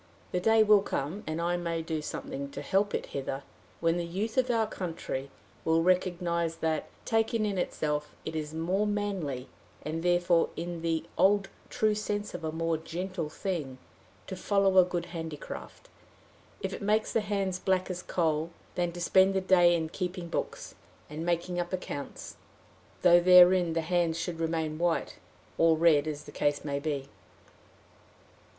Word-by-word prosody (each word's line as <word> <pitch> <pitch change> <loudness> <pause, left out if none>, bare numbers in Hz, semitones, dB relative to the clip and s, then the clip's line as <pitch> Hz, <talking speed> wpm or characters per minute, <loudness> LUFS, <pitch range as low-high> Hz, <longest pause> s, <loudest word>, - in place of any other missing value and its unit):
The 180 - 0
day 225 +3 +5
will 210 -1 +6
come, 175 +2 -3
and 155 0 -2 0.3
may 170 -1 -1
I 165 - -1
do 160 -1 -3
something 275 - -5
to - - -6
help 205 +1 +1
it - - -2
hither, 135 0 -3 0.4
when 165 +1 +2
the 175 - -1
youth 205 +6 -3
of 255 -1 +2
our 225 -2 +2
country 165 -9 -5 0.3
will 165 0 +3
recognize 175 -2 +1
that, 160 -1 -1 0.2
taken 225 -1 +1
in 200 -3 -1
itself, 150 -3 -2
it 160 - -4
is 150 -1 -3
a - - -9
more 185 +6 0
manly, 195 -11 -2 0.4
and 160 +2 -3
therefore 175 -1 +3
in 170 0 -5
the 165 -1 0 0.2
old 200 0 +4 0.2
true 215 -1 +2
sense 210 0 -3
a 160 -3 -4
more 165 0 0
gentle 170 0 -4
thing, 155 -7 -4 0.5
to 190 - -6
follow 195 0 +3
a - - +9
good 175 -1 -3
handicraft, 160 -3 -7 0.7
if - - -3
it - - -6
make 215 +2 +2
the 225 - 0
hands 195 -3 -1
black 185 -1 +1
as 180 0 -4
a - - -23
coal, 160 -2 0 0.2
than 175 -1 0
to 175 - -7
spend 190 +2 +4
the 190 - +2
day 175 -2 +5
in 160 -1 -1
keeping 180 0 -4
books, - - -4 0.4
and 155 +2 -4
making 175 +1 -1
up 175 0 -3
accounts, 180 -6 -6 0.7
though 175 -1 +8
therein 180 -1 +7
the 165 - +1
hands 170 0 +1
should 165 0 -4
remain 160 -1 -1
white 175 -1 0 0.4
or 165 -1 +5
red, 155 -3 +4
as 150 -1 -4
the - - -11
case 145 0 0
may 140 -1 -1
be. 140 -2 -3
175 Hz, 170 wpm, -29 LUFS, 160-190 Hz, 0.7 s, a